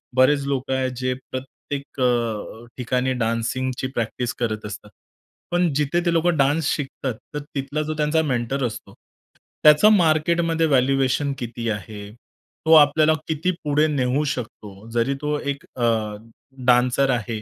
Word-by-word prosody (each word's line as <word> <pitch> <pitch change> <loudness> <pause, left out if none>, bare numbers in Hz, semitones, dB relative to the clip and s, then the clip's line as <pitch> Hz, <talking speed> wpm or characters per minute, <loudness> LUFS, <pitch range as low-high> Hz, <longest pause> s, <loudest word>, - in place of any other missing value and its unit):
बरेच 140 +2 +4
लोकं 135 -1 -1
आहे 130 0 0
जे 130 0 0 0.2
प्रत्येक 135 +2 -6 0.2
अ, 115 -2 -1
ठिकाणी 125 +1 0
डान्सिंगची 125 +3 -2
प्रॅक्टिस 120 +1 -2
करत 110 -3 -2
असतात. 105 0 -8 0.6
पण 175 -1 +2
जिथे 150 +4 +1
ते 170 - +2
लोकं 165 0 +2
डान्स 145 +3 +2
शिकतात, 135 -2 -4 0.2
तर 150 - -2 0.2
तिथला 145 +2 -2
जो 155 +1 -3
त्यांचा 150 +1 +2
मेंटर 135 -2 -1
असतो, 115 - -6 0.7
त्याचं 150 +7 +7
मार्केटमध्ये 165 -1 +2
व्हॅल्युएशन 135 +1 +2
किती 115 -1 -4
आहे? 105 0 -6 0.5
तो 160 - +5
आपल्याला 155 +1 +6
किती 160 +3 0
पुढे 150 +1 +2
नेऊ 140 -1 0
शकतो? 110 -4 -9
जरी 120 +4 +1
तो 150 0 -1
एक 140 -1 -4
अ, 120 -2 +1 0.8
डान्सर 125 +2 +3
आहे, 115 -3 -1
135 Hz, 140 wpm, -22 LUFS, 120-150 Hz, 0.8 s, त्याचं